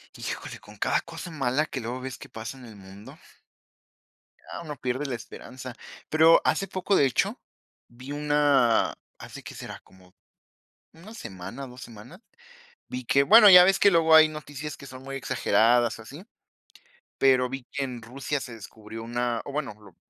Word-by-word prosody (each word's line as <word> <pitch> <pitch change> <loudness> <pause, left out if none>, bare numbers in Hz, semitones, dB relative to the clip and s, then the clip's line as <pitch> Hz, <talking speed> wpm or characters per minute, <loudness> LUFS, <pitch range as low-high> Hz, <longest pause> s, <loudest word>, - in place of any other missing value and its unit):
Híjole, - - -6
con - - -16
cada - - +1
cosa 175 - -9
mala 140 -1 0
que 140 - -6
luego 125 +2 -5
ves 130 -1 -6
que 135 - -11
pasa 115 +1 -8
en 130 - -13
el 110 -2 -12
mundo 95 +1 -13 1.2
ya - - -9
uno 155 -3 -7
pierde 130 +3 -3
la 135 -3 -3
esperanza. 125 +2 -10 0.4
Pero 160 +1 +6
hace 195 - +1
poco, 190 +1 -1
de 140 - +4
hecho, 130 - 0 0.5
vi 125 +3 -11
una 145 -5 +2 0.3
¿hace - - -10
qué - - -9
será?, - - -8
como 95 -1 -22 0.8
una 180 +7 -13
semana, 120 - -8
2 125 0 -13
semanas, 120 - -12 0.7
vi 125 0 -6
que 140 +4 +3
bueno, 210 +7 +8
ya 180 -1 +10
ves 195 +1 +3
que 200 - +5
luego 165 -2 +4
hay 155 0 +8
noticias 150 -1 -7
que 140 - -12
son 130 -1 -11
muy 135 0 -7
exageradas 120 -3 +2
o - - -10
así, 145 - -12 0.9
pero 130 -2 +3
vi 135 -1 -7
que 140 - -2
en 125 -3 -6
Rusia 135 +5 -4
se 125 -3 -8
descubrió 110 0 -10
una 120 0 -2
o - - -7
bueno, 145 -4 -3
lo 100 -5 -17
130 Hz, 175 wpm, -26 LUFS, 120-150 Hz, 1.2 s, ya